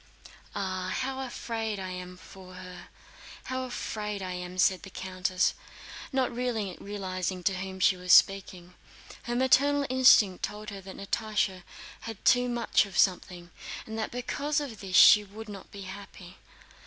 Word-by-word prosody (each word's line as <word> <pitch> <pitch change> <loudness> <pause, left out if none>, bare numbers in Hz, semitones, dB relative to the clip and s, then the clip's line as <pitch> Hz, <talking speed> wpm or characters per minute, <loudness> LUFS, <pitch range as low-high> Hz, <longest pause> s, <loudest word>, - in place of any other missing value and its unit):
"Ah, 185 -2 -3
how 265 0 -3
afraid 225 -4 -4
I 185 -1 -5
am 180 0 -7
for 185 0 -13
her, 180 0 -10 0.6
how 260 0 -3
afraid 210 -5 -4
I 185 - -4
am!" 180 0 -6
said 185 -1 +3
the 195 - -10
countess, 185 0 -1 0.6
not 260 -2 0
realizing 195 -5 -3
to 190 0 +1
whom 190 0 -6
she 185 - +4
was 180 0 -2
speaking. 185 -2 +4 0.5
Her 240 - -4
maternal 280 +3 +3
instinct 225 -7 +5
told 210 +1 -4
her 200 -1 -8
that 190 0 -10
Natásha 210 -2 -1 0.5
had 225 - -9
too 250 -1 +4
much 235 -3 +2
of 195 - -8
something, 180 -2 +1 0.3
and 220 - -7
that 220 - -2
because 285 +5 -2
of 260 -8 -6
this 190 -2 -4
she 210 +2 +9
would 215 +2 -10
not 200 -2 -10
be 200 - -10
happy. 190 -2 -10
195 Hz, 155 wpm, -28 LUFS, 185-230 Hz, 0.6 s, she